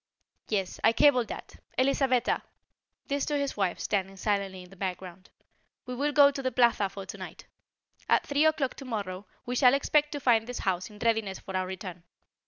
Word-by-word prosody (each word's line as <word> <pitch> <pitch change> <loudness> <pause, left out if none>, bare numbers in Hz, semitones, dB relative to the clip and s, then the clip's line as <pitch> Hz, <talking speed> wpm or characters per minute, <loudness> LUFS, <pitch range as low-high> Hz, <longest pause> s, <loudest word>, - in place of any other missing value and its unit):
"Yes, 195 -4 -1
I 225 - +5
cabled 255 -4 +4
that. - - -8 0.2
Elisabetta," 260 -1 +2 0.6
this 280 -1 -1
to 295 - 0
his 280 -1 -2
wife 195 -4 0
standing 195 -1 -2
silently 195 -2 -1
in 180 - -16
the - - -13
background 185 -1 -6 0.6
"we 250 - -5
will 285 +4 0
go 285 -1 +7
to 275 - -5
the 260 -1 -1
Plaza 235 -5 +3
for 195 0 -8
tonight. - - -9 0.6
At - - +4
three 285 +2 +2
o'clock 305 -5 +1
tomorrow 205 -7 -5 0.2
we 245 - -3
shall 250 0 +6
expect 295 +1 +2
to 290 - -3
find 230 -4 +3
this 245 - -5
house 185 +1 0
in 210 - -14
readiness 220 -4 0
for 190 - -8
our 185 0 0
return. 185 -2 -7
225 Hz, 185 wpm, -28 LUFS, 190-270 Hz, 0.6 s, go